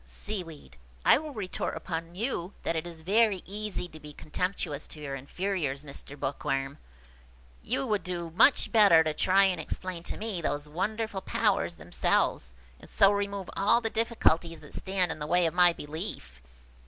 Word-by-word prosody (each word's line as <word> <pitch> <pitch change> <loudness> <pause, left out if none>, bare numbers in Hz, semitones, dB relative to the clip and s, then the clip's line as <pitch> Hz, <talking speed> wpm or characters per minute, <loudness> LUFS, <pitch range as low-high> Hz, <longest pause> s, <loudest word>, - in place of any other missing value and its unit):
Seaweed. 165 - -7 0.3
"I - - +7
will 310 0 -7
retort 210 -8 -3
upon 165 0 -5
you 200 -4 -3
that 165 - -1
it 160 +2 -2
is 165 -2 -9
very 205 +2 +3
easy 205 -2 -4
to 155 - -12
be 150 -1 -11
contemptuous 155 -2 -3
to 155 - -10
your 140 -2 -5
inferiors, 145 0 -3
Mr. 140 0 -7
Bookworm. 135 +1 -2 0.8
You 135 - -1
would 210 -2 0
do 170 -2 -5
much 230 - +5
better 200 -8 +7
to 155 -1 -1
try 190 +5 +4
and 185 -4 +2
explain 180 +2 -5
to - - -5
me 215 -5 -2
those 145 -1 -2
wonderful 205 +5 -2
powers - - +1
themselves, 65 - 0 0.3
and - - -15
so 195 - +5
remove 200 -2 -2
all 210 +4 +4
the 225 -2 -2
difficulties 175 -8 +1
that - - -13
stand 190 -3 0
in - - -5
the 150 - -4
way 175 +2 +3
of 165 - 0
my 175 0 +6
belief." 160 - -5
175 Hz, 170 wpm, -29 LUFS, 155-200 Hz, 0.8 s, I